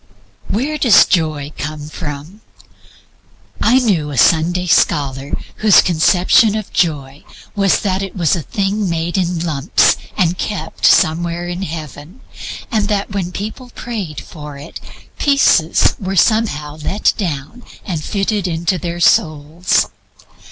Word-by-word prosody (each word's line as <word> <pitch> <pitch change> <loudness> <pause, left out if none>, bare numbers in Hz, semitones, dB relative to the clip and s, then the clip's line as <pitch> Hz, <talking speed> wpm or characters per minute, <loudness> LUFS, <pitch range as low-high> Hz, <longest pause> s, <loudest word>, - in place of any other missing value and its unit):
Where 285 +8 -2
does 240 -7 +6
Joy 155 -5 -1
come 150 0 -5
from? 155 +5 -7 1.2
I 245 - +4
knew 195 - +1
a 140 - -6
Sunday 175 +5 +3
scholar 140 -5 +1 0.3
whose 215 -3 +5
conception 180 +5 +3
of 215 -2 -5
Joy 145 -5 -1 0.3
was 195 -2 +2
that 190 -2 -1
it 195 -1 -6
was 170 -3 +1
a 170 - -3
thing 200 +2 -2
made 165 +1 -2
in 180 -3 -1
lumps 150 -1 +2 0.2
and 180 -3 +1
kept 185 -7 -2
somewhere 170 +2 +2
in 175 +1 -5
Heaven, 155 - -8 0.5
and 215 -3 +1
that 205 -1 -2
when 190 -3 -3
people 220 +7 -7
prayed 205 -11 -5
for 150 -3 -10
it, 145 +4 -10 0.4
pieces 275 - +3
were 195 -1 -3
somehow 160 -8 +1
let 190 +7 0
down 170 - -5 0.2
and 165 -7 -4
fitted 200 0 -1
into 170 +2 -1
their 170 +1 -5
souls. 155 +1 +2
175 Hz, 130 wpm, -17 LUFS, 155-200 Hz, 1.2 s, does